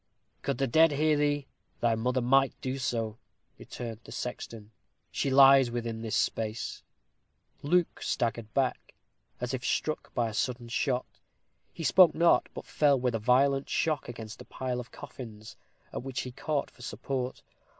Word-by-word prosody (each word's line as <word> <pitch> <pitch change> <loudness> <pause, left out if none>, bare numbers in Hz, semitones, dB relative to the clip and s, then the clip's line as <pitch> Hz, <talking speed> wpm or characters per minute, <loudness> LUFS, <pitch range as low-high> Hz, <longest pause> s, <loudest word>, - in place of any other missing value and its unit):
"Could 140 -2 -2
the 135 - +1
dead 160 +5 +5
hear 155 +2 +3
thee, 145 -1 +1 0.3
thy 120 -1 +2
mother 125 +3 0
might 135 +2 +3
do 130 +1 -3
so," 115 -3 -2 0.4
returned 115 -3 -7
the - - -12
sexton. 115 -3 -6 0.4
"She 140 - -1
lies 135 -1 +7
within 115 -1 -4
this 115 -1 -2
space." 110 0 -1 0.8
Luke 175 +4 +1
staggered 115 -2 -1
back, 130 -2 -1 0.4
as 125 +1 -3
if 125 -2 -3
struck 155 +5 -1
by 120 -2 +1
a 110 - -6
sudden 120 +1 -2
shot. 125 +1 -1 0.5
He 165 - -7
spoke 175 +5 +6
not, 170 +1 +4
but - - -7
fell 145 -3 +3
with 125 -1 0
a 115 - 0
violent 135 +4 +3
shock 155 -6 0
against 110 -2 -8
a - - -11
pile 125 -1 -3
of 120 - -8
coffins, 110 -4 -10 0.4
at - - -3
which 130 0 -4
he 125 - -6
caught 145 +3 -2
for - - -18
support. 130 0 -4
125 Hz, 160 wpm, -29 LUFS, 115-140 Hz, 0.8 s, lies